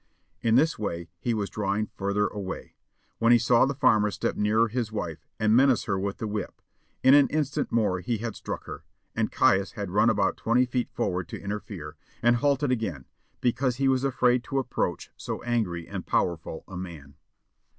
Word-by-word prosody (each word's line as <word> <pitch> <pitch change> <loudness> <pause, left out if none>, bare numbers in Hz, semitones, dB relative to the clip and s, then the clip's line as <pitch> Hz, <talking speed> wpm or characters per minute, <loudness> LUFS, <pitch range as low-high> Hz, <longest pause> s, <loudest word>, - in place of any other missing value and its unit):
In 115 -1 +3
this 155 +2 +3
way 85 -5 -4
he 120 -2 -1
was 100 -2 -2
drawing 105 +1 -1
further 100 +1 0
away, 100 -3 -5 0.5
when 115 +1 +4
he 120 - +8
saw 120 +1 +4
the 140 - -2
farmer 110 -6 +4
step - - -2
nearer 110 +2 +2
his 115 -1 -3
wife 110 - -5
and 110 0 +3
menace 130 -1 +4
her 95 -2 -1
with 100 +1 -3
the - - -4
whip; 105 -1 -4 0.4
in 130 +1 +7
an 145 -1 +7
instant 150 -1 -1
more 105 -5 +1
he 115 +6 -2
had 115 0 -4
struck - - -5
her, - - -8 0.3
and - - 0
Caius 95 0 +3
had 100 -3 -5
run 105 +4 +4
about 100 -3 +1
twenty 120 +3 +2
feet 125 0 -2
forward 90 -1 -2
to - - -7
interfere, 100 -6 -6 0.3
and 120 0 +5
halted 140 +1 +1
again, 95 - -2 0.4
because 125 +1 +1
he 135 +1 +1
was 130 0 +2
afraid 125 -2 +2
to 135 - -3
approach 120 - -2
so - - -5
angry 105 -9 -1
and - - -5
powerful 80 -2 -1
a 95 - -9
man. 80 -6 -8
110 Hz, 190 wpm, -27 LUFS, 100-125 Hz, 0.5 s, he